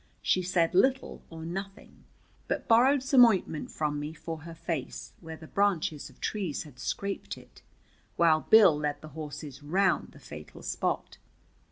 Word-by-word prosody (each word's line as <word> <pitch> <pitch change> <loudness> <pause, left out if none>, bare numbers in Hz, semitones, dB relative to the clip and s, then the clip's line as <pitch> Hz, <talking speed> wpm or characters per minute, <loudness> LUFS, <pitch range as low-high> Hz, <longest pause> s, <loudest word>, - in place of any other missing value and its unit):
She 185 - +2
said 175 -2 +1
little 260 +8 +2
or 160 -1 -8
nothing, 195 +3 -7 0.4
but - - -2
borrowed 255 +4 +5
some 265 -2 +7
ointment 190 -9 +2
from 150 -1 -2
me 150 +2 -5
for 165 +1 -6
her 165 +1 -9
face, 160 -5 -5
where 160 -1 -8
the 160 - -12
branches 170 -5 0
of - - -21
trees 190 -9 -2
had 140 -5 -15
scraped 200 +9 -4
it, - - -17 0.5
while 160 -2 +4
Bill 205 -8 +7
led 150 -1 -2
the 155 - -10
horses 150 -3 -8
round 190 +7 +1
the - - -15
fatal - - -11
spot. - - -2
165 Hz, 160 wpm, -29 LUFS, 155-200 Hz, 0.5 s, some